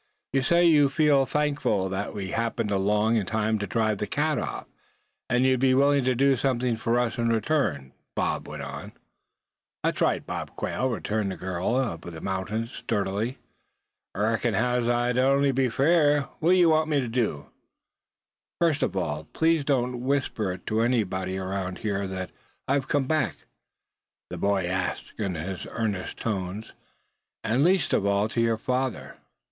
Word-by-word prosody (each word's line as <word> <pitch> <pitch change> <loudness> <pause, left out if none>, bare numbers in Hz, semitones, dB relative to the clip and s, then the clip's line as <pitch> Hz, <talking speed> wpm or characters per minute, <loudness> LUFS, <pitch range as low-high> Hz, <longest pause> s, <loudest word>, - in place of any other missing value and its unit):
"You 135 - +3
say 170 +6 +3
you 150 -4 +5
feel 140 -2 +3
thankful 145 -10 0
that 95 +2 -3
we 95 -2 -4
happened 115 -1 -1
along 105 +3 +2
in 100 -4 -1
time 110 0 0
to 105 - -3
drive 110 0 0
that 105 - -3
cat 150 -1 0
off; - - -4 0.6
and 125 +2 +3
you'd 130 -1 +3
be 130 0 +4
willing 140 0 +4
to 130 -1 +2
do 135 +2 +4
something 125 -2 0
for 115 +1 0
us 120 0 0
in 115 0 +1
return?" 110 - 0 0.2
Bob - - -1
went - - -6
on. - - -7 0.9
"Thet's - - -1
right, - - +1
Bob - - -5
Quail," 130 - -1
returned 110 -3 -1
the 95 - -4
girl 95 +6 -1
of 115 -11 -1
the 85 -2 -8
mountains 105 +6 -3
sturdily. 105 +4 -2 0.8
"Reckons 110 +1 +1
as 125 +2 +1
how 120 0 +1
it'd 125 +1 +2
on'y 140 +1 +3
be 130 -1 +1
fair. 145 +3 +3 0.2
What 175 +4 +4
ye 180 -1 +5
want 155 -1 +3
me 145 -2 +2
to 125 - -2
do?" 115 - -2 1.1
"First 165 -4 +2
of - - -1
all, 80 -4 -2
please 160 -2 +2
don't 125 -3 0
whisper 130 -7 -1
it 90 - -11
to 110 +1 0
anybody 95 -6 0
around 95 -1 -3
here 100 -2 -2
that 95 -2 -5 0.4
I 135 - +2
have 140 -2 0
come 145 -1 +1
back," 135 - 0 1.0
the - - -5
boy 100 -2 +1
asked 90 0 -3
in 95 -4 -1
his 90 +3 -5
earnest 105 -5 -3
tones; 100 0 -4 0.7
"and 120 +5 +2
least 180 -1 +2
of 100 - +2
all 100 +1 +2
to 115 - 0
your 115 -1 +2
father. 130 +2 -2
115 Hz, 170 wpm, -26 LUFS, 100-135 Hz, 1.1 s, you